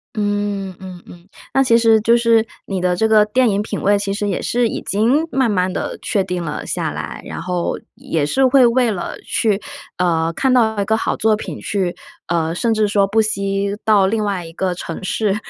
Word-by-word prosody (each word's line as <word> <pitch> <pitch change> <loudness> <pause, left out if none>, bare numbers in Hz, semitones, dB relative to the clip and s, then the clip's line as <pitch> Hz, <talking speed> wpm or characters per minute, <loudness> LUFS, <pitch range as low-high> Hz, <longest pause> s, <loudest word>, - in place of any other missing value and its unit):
嗯， 205 -2 -2
嗯 185 -2 -9
嗯， 175 +1 -15 0.2
那 270 - +4
其 235 -3 +4
实 225 -1 +4
就 230 +2 +4
是 230 -1 +3 0.2
你 195 -2 -3
的 180 0 +1
这 220 - +2
个 215 -1 +5
电 245 +3 +2
影 200 0 0
品 210 -1 -4
位 205 0 +3
其 200 -1 -2
实 205 0 -2
也 200 - -1
是 245 0 0
已 - - -4
经 240 +10 +1
慢 260 -3 +1
慢 185 -2 +1
地 - - -4
确 195 -2 0
定 180 -1 -3
了 150 -3 -5
下 - - -2
来， - - -6
然 - - -6
后， 180 0 -2 0.2
也 155 -3 -2
是 265 - +2
会 255 -1 +5
为 240 0 +2
了 190 -4 -4
去 215 -3 0 0.4
呃， 165 -2 +1
看 265 +9 +1
到 220 -4 +2
一 200 - +1
个 220 - +2
好 - - -1
作 220 -1 +2
品 - - -7
去 190 -4 -2 0.3
呃， 165 -1 -1
甚 225 +5 0
至 215 -1 +2
说 200 -1 +2
不 220 +3 +2
惜 200 -1 -1
到 205 -3 +4
另 215 +1 0
外 195 -4 -2
一 165 - -11
个 185 +2 -1
城 170 +1 -7
市 205 +1 0
205 Hz, 230 characters per minute, -19 LUFS, 185-225 Hz, 0.4 s, 个